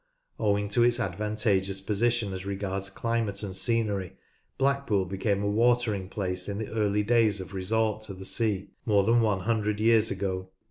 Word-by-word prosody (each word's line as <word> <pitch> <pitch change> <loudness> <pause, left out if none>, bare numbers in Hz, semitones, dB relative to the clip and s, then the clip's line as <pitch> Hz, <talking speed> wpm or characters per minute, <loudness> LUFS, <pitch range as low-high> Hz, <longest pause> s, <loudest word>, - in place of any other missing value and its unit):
Owing 105 -1 +1
to 110 +4 +2
its 120 0 +3
advantageous 100 -1 0
position 105 +1 0
as 95 0 -5
regards 100 0 -3
climate 110 -1 -2
and 95 -2 -5
scenery, 105 -4 -1 0.4
Blackpool 135 -8 +1
became 100 +2 -1
a - - 0
watering 110 -3 +1
place 90 -2 -3
in 100 - -3
the 110 -1 -5
early 105 -1 +1
days 110 -2 +3
of 95 +1 -8
resort 110 +3 0
to 100 - -7
the 95 +1 -9
sea 105 -2 0
— - - -43
more 100 -2 +4
than 115 +3 +4
one 105 -4 +1
hundred 105 -1 0
years 115 0 +4
ago. 95 -1 -3
105 Hz, 175 wpm, -28 LUFS, 95-115 Hz, 0.4 s, more